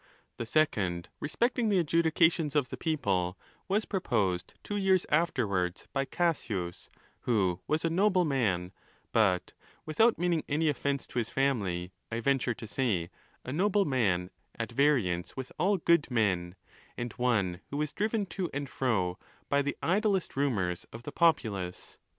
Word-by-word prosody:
The 115 - -4
second, 100 - +1
re 150 - -4
specting 240 +1 +1
the 200 - +3
adjudications 165 -2 +2
of 140 -4 +2
the - - -4
people, 100 - 0 0.3
was 205 +3 +1
proposed 105 - -1
two 205 - -3
years 190 -2 +3
afterwards 105 - 0
by 135 - 0
Cassius, 105 - -2 0.3
who 95 -7 +1
wasa 155 +2 +1
nobleman; 140 - +2 0.4
but 95 -5 +2 0.3
without 220 +10 +3
meaning 170 -2 +1
any 155 +2 +2
offence 140 -1 -1
to - - -3
his 115 - -2
family, 100 -10 0 0.2
1 115 - -2
venture 135 -3 +1
to 115 - -8
say, 105 -8 -1 0.3
a 125 - -4
noble 200 +4 +2
man 95 -10 +1 0.3
at - - -3
variance 120 -13 +1
with 130 -1 -5
all 195 +2 +3
good 170 -3 +3
men, 95 -7 0 0.4
and 120 -2 -4
one 100 -8 0
who 140 - -4
was 150 0 -1
driven 215 0 0
to 180 -1 -3
and 140 -1 -4
fro 95 -9 0 0.3
by 140 0 +3
the 145 0 -2
idlest 195 0 +1
rumours 100 -11 0
of 115 +1 -9
the - - -6
populace. 110 - 0
135 Hz, 150 wpm, -30 LUFS, -, 0.4 s, the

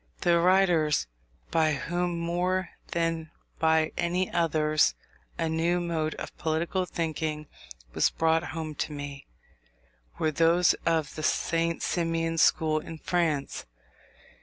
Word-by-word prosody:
The 170 -1 +4
writers 175 - +3 0.5
by 160 -2 +3
whom, 175 +5 -2
more 175 +2 -1 0.2
than 165 -1 -1 0.3
by 160 -1 +3
any 180 +2 0
others, 155 -2 +2 0.4
a 165 - 0
new 165 +2 +1
mode 165 -3 -2
of - - -7
political 170 +3 -1
thinking 155 -2 -3 0.5
was - - +3
brought 160 +1 +1
home 160 -1 -5
to - - -2
me, 145 -1 -7 0.9
were 155 - +1
those 165 +3 +4
of 160 -3 +1
the 155 - -6
St. 165 +1 0
Simonian 165 -1 0
school 155 -1 +3
in 160 +1 -8
France. 155 - -1
165 Hz, 120 wpm, -28 LUFS, 155-170 Hz, 0.9 s, The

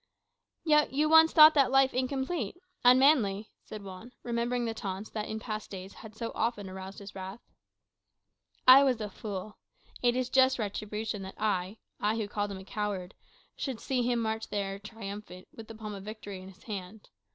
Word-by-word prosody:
"Yet 300 -3 +3
you 300 +3 +2
once 320 0 +7
thought 310 0 +9
that 275 -4 +4
life 270 0 +4
incomplete, 265 - -2 0.3
unmanly," 245 -5 +4
said 210 -1 -9
Juan, 195 +6 -10
remembering 240 +1 -1
the 225 - -2
taunts 200 -1 -5
that 215 -1 -4
in 220 - -3
past 215 -2 -5
days 190 0 -8
had 220 -1 -12
so 230 +1 -4
often 220 -3 -1
aroused 190 +1 -8
his 200 -1 -10
wrath. 190 +3 -7 1.3
"I 260 +2 +10
was 255 -4 +2
a 210 -1 -4
fool. 205 0 -7 0.4
It 240 -1 +3
is 255 -1 0
just 260 0 +5
retribution 210 -1 -3
that 190 0 -8
I 200 -1 -1 0.2
I 210 +2 +1
who 220 -2 -2
called 205 0 -2
him 190 -1 -8
coward 205 -3 -3 0.4
should 260 -5 -4
see 260 -2 -1
him 240 0 +1
march 220 -1 -1
in - - -25
there 195 -1 -3
triumphant, 200 -3 -9
with 225 -1 -10
the 225 - -9
palm 215 -1 -7
of 195 - -7
victory 205 -2 -8
in 185 - -11
his 195 - -17
hand. 205 -1 -7
215 Hz, 185 wpm, -30 LUFS, 200-245 Hz, 1.3 s, I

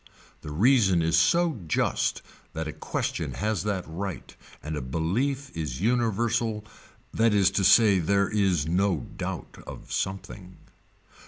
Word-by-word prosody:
The - - -8
reason 95 - +3
is 80 0 +2
so 160 - +3
just - - 0 0.3
that 80 0 -4
a 75 - -5
question - - -3
has 105 0 -1
that 100 -3 -1
right 90 +3 -6 0.3
and 75 +1 -4
a 75 - -3
belief 105 - -2
is 75 -6 -4
universal 115 0 0 0.5
that 115 -1 +3
is 100 -1 +4
to 95 - 0
say 105 -1 +6
there 100 +3 +2
is 95 -8 +1
no 90 -4 +1
doubt - - -6
of - - -10
something. 95 -1 -5
100 Hz, 140 wpm, -26 LUFS, 80-110 Hz, 0.5 s, say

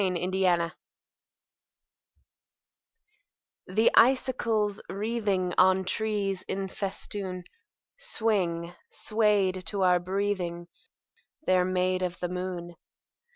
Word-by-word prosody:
SILVER 185 -2 +1
FILIGREE 180 -3 +2 3.0
The 215 +5 +3
icicles 230 -5 +3
wreathing 200 -4 -1
On 190 0 +4
trees 200 -1 -1
in 195 0 -3
festoon 190 -1 -5 0.6
Swing, 190 - 0 0.2
swayed 205 -4 +1
to 200 -2 0
our 180 -1 +4
breathing: 180 -2 -2 0.8
They're 185 -1 +3
made 185 0 0
of 180 -1 -3
the 175 - -2
moon. 180 -1 -5
190 Hz, 85 wpm, -28 LUFS, 180-205 Hz, 3.0 s, On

